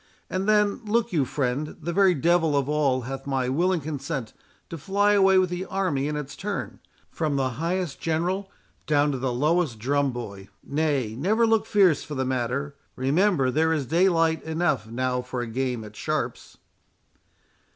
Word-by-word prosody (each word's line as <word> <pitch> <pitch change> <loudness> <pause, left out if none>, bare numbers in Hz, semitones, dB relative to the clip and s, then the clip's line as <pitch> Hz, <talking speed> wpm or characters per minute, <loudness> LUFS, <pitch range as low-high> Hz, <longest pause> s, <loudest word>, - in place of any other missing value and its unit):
And 190 +2 -1
then, 210 +2 +2
look 225 0 0
you, 145 -5 +2
friend, 140 +3 -2
the 170 +2 -4
very 190 -1 +4
devil 165 0 +2
of 140 -1 0
all 145 -4 +1
hath 135 +3 -6
my 130 -2 0
willing 175 +5 +1
consent 140 -4 -4 0.4
to 165 - -4
fly 200 +5 +2
away 195 -1 +5
with 185 -1 +2
the 180 +1 -3
army 180 -9 -1
in 150 - -2
its 145 -1 -6
turn, 205 0 -5 0.3
from 155 -3 -1
the 130 -2 0
highest 175 -3 -2
general 180 +5 -1 0.4
down 145 -1 +3
to 135 - -3
the 130 0 -1
lowest 150 0 +1
drum 140 +4 +1
boy. 100 -5 -8
Nay, 140 -7 -1
never 210 - +2
look 225 -1 +2
fierce 185 -8 +4
for 150 - -7
the 130 0 -1
matter; 130 +3 -2 0.2
remember 140 +1 +2
there 160 +4 +2
is 155 -4 0
daylight 165 +1 +2
enough 160 -8 -1
now 125 +2 -1
for 125 0 -5
a - - -2
game 125 0 -2
at 105 0 -11
sharps." - - -3
150 Hz, 170 wpm, -25 LUFS, 130-180 Hz, 0.4 s, away